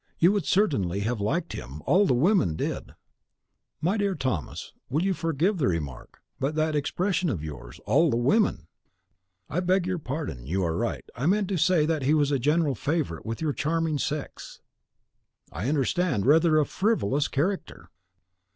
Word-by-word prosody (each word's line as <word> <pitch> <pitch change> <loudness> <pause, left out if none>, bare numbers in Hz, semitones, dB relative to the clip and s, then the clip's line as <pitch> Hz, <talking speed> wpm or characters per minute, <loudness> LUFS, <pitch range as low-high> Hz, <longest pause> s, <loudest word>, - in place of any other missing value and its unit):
You 175 +3 +5
would 200 -6 -1
certainly 100 - +1
have 110 +1 -2
liked 160 - -1
him, 70 +5 -8
all 195 +2 +4
the 125 - +3
women 140 - +3
did." - - -4 0.9
"My 185 +7 +1
dear 200 -2 0
Thomas, 130 - -3 0.2
you 135 - -1
will - - +2
forgive 165 +4 0
the 145 - +2
remark, 75 -8 -4 0.2
but 140 +3 -1
that 155 0 +1
expression 180 +5 0
of 90 - -3
yours, 65 -5 -8
'all 145 +10 +4
the 115 - +1
WOMEN' 120 - +2 0.4
" 95 0 -47 0.3
"I 165 - -2
beg 185 0 +2
your 185 -1 -2
pardon, 135 - -5
you 95 +5 0
are 80 -2 0
right. - - -2
I 125 +6 -1
meant 200 +1 +2
to 190 - 0
say 165 -1 +3
that 160 -1 0
he 140 +4 +3
was 145 -2 +2
a 140 - +1
general 150 +2 +2
favourite 140 - -2
with 115 +4 -4
your 155 -3 0
charming 160 0 -1
sex." 150 0 -5 0.9
"I 90 - -3
understand, 145 - +1
rather 155 +3 +5
a 150 - +4
frivolous 150 - 0
character." 180 +8 -3
150 Hz, 175 wpm, -26 LUFS, 115-175 Hz, 0.9 s, You